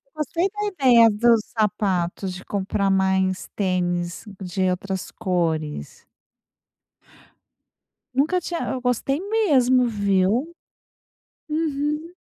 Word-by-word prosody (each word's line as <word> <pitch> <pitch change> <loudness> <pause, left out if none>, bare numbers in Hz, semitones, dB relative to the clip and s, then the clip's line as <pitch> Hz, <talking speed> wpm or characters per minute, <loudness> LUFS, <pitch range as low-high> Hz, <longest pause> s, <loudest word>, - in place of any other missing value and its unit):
Gostei 330 +5 -1
da 415 +1 -3
ideia 250 - +5
dos 230 +2 +4 0.2
sapatos 195 -3 0
de 180 - -9
comprar 200 0 -1
mais 190 -1 +1
tênis 175 -2 -1 0.2
de 185 0 -1
outras 190 +1 -3
cores. 165 - -3 2.1
Nunca 315 +7 +2
tinha 340 0 -4
hã - - -2
eu 255 - -4
gostei 255 +4 0
mesmo, 280 - +3
viu. 205 - +1 1.0
Uhum. 305 +1 -2
215 Hz, 100 wpm, -23 LUFS, 185-290 Hz, 2.1 s, ideia